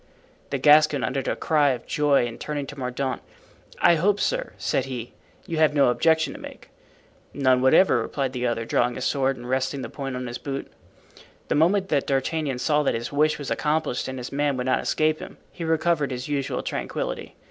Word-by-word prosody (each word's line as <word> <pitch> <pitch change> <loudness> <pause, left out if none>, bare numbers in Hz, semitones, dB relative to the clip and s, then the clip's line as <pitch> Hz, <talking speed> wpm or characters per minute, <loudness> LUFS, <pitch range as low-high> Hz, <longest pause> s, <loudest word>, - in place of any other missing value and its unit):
The 140 - -1
Gascon 150 0 +5
uttered 135 - -2
a - - 0
cry 150 -3 +2
of 120 - -7
joy 145 -5 +2
and 115 -1 -7
turning 145 -2 -3
to 145 - -9
Mordaunt: 130 0 -3 0.6
"I 170 - +5
hope, 200 +5 +2
sir," - - -1
said 130 - 0
he, 125 -3 -6 0.3
"you 165 - -4
have 155 -1 +3
no 140 -3 +5
objection 160 +5 +2
to - - -10
make." - - -11 0.6
"None, 130 -2 +3
whatever," 130 +8 +5
replied 135 -2 -3
the 125 -1 -1
other, 115 -1 -2
drawing 120 +1 +1
his 130 - -4
sword 135 -1 +1
and 120 0 -9
resting 130 +1 -1
the - - -6
point 135 -2 -5
on 125 0 -4
his 120 0 -5
boot. 140 -1 -5 0.8
The - - +2
moment 190 +5 +2
that 145 -3 +1
D'Artagnan 140 0 -1
saw 150 +4 +2
that 145 - +1
his 115 +1 -4
wish 150 +2 +2
was 145 - -6
accomplished 150 -4 -1
and 130 0 -5
his 125 -1 -6
man 145 -1 0
would 125 - -2
not 130 - +1
escape 155 0 +1
him, - - -10
he 170 - -7
recovered 160 -2 +1
his 125 -1 -5
usual 140 -2 -2
tranquillity. - - -4
140 Hz, 200 wpm, -24 LUFS, 130-155 Hz, 0.8 s, Gascon